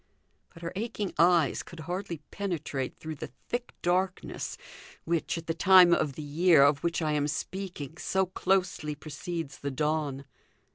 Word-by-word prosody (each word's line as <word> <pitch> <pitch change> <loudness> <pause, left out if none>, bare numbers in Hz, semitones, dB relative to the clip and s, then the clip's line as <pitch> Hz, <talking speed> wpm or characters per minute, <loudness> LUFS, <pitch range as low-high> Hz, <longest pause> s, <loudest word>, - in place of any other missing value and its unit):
But 165 -1 -14
her 170 - -4
aching 210 -2 -3
eyes 170 -3 +4
could 170 -2 -10
hardly 175 -1 -4
penetrate 160 -9 -3
through 160 0 -6
the - - -6 0.2
thick 240 0 -2
darkness, 185 +1 -1 0.5
which, 165 -1 -1
at 165 - -6
the 165 - -1
time 180 0 +7
of 150 -4 +1
the 155 - -7
year 155 +1 +5
of 145 0 +3
which 170 -1 0
I 155 - +1
am 150 -1 +1
speaking, 170 -1 -5
so 190 +1 +1
closely 180 -5 0
precedes 155 0 -6
the 140 - -3
dawn. 145 -1 -1
165 Hz, 155 wpm, -29 LUFS, 150-180 Hz, 0.5 s, time